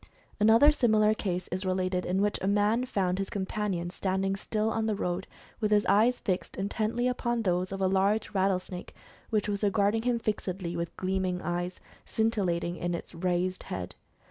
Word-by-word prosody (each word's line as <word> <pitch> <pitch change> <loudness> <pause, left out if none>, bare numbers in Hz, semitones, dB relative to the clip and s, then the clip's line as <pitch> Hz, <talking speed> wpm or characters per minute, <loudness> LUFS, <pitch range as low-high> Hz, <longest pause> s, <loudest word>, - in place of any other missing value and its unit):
Another 225 +8 +7
similar 215 -6 +3
case 185 -4 -3
is 185 +2 -2
related, 185 -1 0
in 190 +2 +1
which 205 0 0
a 190 - -1
man 210 +4 +2
found 185 -5 0
his 195 - -2
companion 190 -3 -2
standing 190 +1 -1
still 215 +2 -1
on 220 0 0
the 215 - +1
road, 180 -1 -2 0.3
with 215 -2 +1
his 210 -1 +3
eyes 230 +5 +4
fixed 185 -4 -2
intently 215 +5 0
upon 240 -2 -1
those 180 -1 0
of 195 0 -4
a 190 - +3
large 200 +3 +1
rattlesnake 185 -2 -1 0.3
which 215 -2 +1
was 205 0 -2
regarding 205 +2 +2
"him 245 0 +1
fixedly 190 -5 -3
with 170 0 -4
gleaming 185 -1 -1
eyes, 175 +2 -2 0.2
scin 225 0 +1
tillating 175 -5 -1
in 175 0 -1
its 170 - -8
raised 180 +1 -1
head. 90 -1 -4
195 Hz, 175 wpm, -29 LUFS, 180-215 Hz, 0.3 s, Another